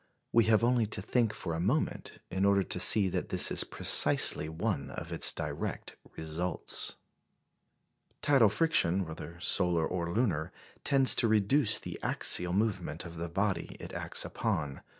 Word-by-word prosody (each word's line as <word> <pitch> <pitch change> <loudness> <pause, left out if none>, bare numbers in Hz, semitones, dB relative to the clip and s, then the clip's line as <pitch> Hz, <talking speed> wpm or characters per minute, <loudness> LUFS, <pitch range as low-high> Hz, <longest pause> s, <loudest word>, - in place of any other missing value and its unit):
We 115 -2 +3
have 110 0 +2
only 120 -2 +1
to 105 - -4
think 115 0 -1
for 90 -6 -6
a 80 - -4
moment 120 - -3
in 95 +1 -2
order 100 -1 +2
to 90 - -4
see 100 +2 +6
that - - -5
this - - +3
is - - +3
precisely 80 - +4
one 80 -4 -4
of - - -9
its - - +3
direct - - -7 0.2
results. 80 +3 -4 1.3
Tidal 135 -7 +3
friction, 95 - +1
whether 85 +1 -10
solar 90 -2 +1
or 85 -1 -4
lunar, 105 -6 -2 0.3
tends 135 -2 +3
to 115 - +1
reduce 110 +3 +2
the - - -8
axial 90 0 +2
movement 105 +2 -3
of 85 0 -11
the 85 +1 -6
body 95 0 -3
it - - -10
acts - - +1
upon. 70 -3 -4
95 Hz, 155 wpm, -29 LUFS, 85-110 Hz, 1.3 s, see